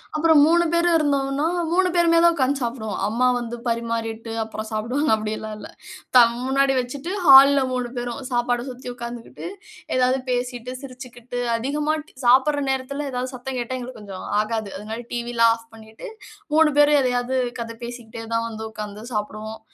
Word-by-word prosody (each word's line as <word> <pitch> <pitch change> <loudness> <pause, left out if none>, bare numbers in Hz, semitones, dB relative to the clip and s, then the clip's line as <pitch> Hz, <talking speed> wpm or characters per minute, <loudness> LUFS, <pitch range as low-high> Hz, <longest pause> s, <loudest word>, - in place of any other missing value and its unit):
அப்புறம் 315 -1 +5
3 340 +2 +4
பேர் 340 +1 +3
இருந்தோம்னா, 280 -1 +1 0.3
3 370 +1 +3
பேருமே 340 -1 +4
தான் 340 0 +6
உட்காந்து 275 0 +1
சாப்பிடுவோம். 230 -3 -4
"அம்மா 240 +4 +1
வந்து 240 0 -4
பரிமாறிட்டு, 230 -1 -3
அப்புறம் 220 0 -6
சாப்பிடுவாங்க." 245 +8 -1
அப்படில்லாம் 215 0 -4
இல்ல. - - -9 0.5
த - - +10 0.3
முன்னாடி 270 0 +2
வச்சிட்டு 275 +8 -5 0.2
ஹால்ல 275 +1 +9
3 250 -1 -1
பேரும் 240 0 -4
சாப்பாட 240 0 0
சுத்தி 250 0 -9
உட்காந்துகிட்டு 235 +3 -8 0.5
ஏதாவது 255 +1 +2
பேசிட்டு, 245 0 -3
சிரிச்சிகிட்டு, 250 -2 -8 0.2
அதிகமா 295 +6 -1
ட் - - -19
சாப்பிடுற 270 +4 +4
நேரத்தில 275 +2 -2
ஏதாவது 255 +1 -3
சத்தங் 255 +1 -5
கேட்டா 255 +2 -3
எங்களுக்கு 250 -2 -8
கொஞ்சம் 195 -2 -8 0.2
ஆகாது. 215 -1 -3
அதனால 220 +3 -6
டிவில்லாம் 235 -1 +2
ஆஃப் 230 0 -16
பண்ணிட்டு, 220 - -11 0.5
3 320 -1 +6
பேரும் 290 0 +6
எதையாது 250 0 0 0.2
கத 230 0 -5
பேசிக்கிட்டே 230 -1 -8
தான் 230 0 0
வந்து 220 0 -7
உட்காந்து 210 -1 -7
சாப்பிடுவோம். 215 +1 -4
245 Hz, 155 wpm, -23 LUFS, 230-275 Hz, 0.5 s, த